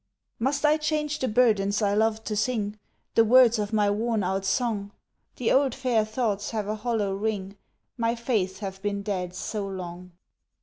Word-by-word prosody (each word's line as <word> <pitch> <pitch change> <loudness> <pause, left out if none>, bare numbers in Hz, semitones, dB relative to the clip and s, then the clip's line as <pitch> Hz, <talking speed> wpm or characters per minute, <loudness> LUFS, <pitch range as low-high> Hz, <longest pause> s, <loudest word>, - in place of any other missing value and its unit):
Must 275 +5 0
I 300 +1 +5
change 305 -1 -1
the 260 - 0
burdens 210 -4 +3
I 205 -2 +1
loved 220 +1 +1
to 215 - -2
sing, 215 -2 -1 0.3
The 225 - +5
words 240 0 +6
of 205 0 -2
my 210 -2 +2
worn 220 0 0
out 190 +1 -1
song? 205 0 0 0.5
The 245 - 0
old 270 -2 +3
fair 250 -5 +1
thoughts 215 -2 -1
have 215 -3 -3
a 210 - -1
hollow 215 -2 -1
ring, 200 -1 -3 0.4
My 230 0 +1
faiths 215 -6 -1
have 195 0 -6
been 200 -1 -2
dead 185 -3 -3
so 205 +2 -3
long. 180 -1 -7
215 Hz, 175 wpm, -26 LUFS, 200-235 Hz, 0.5 s, words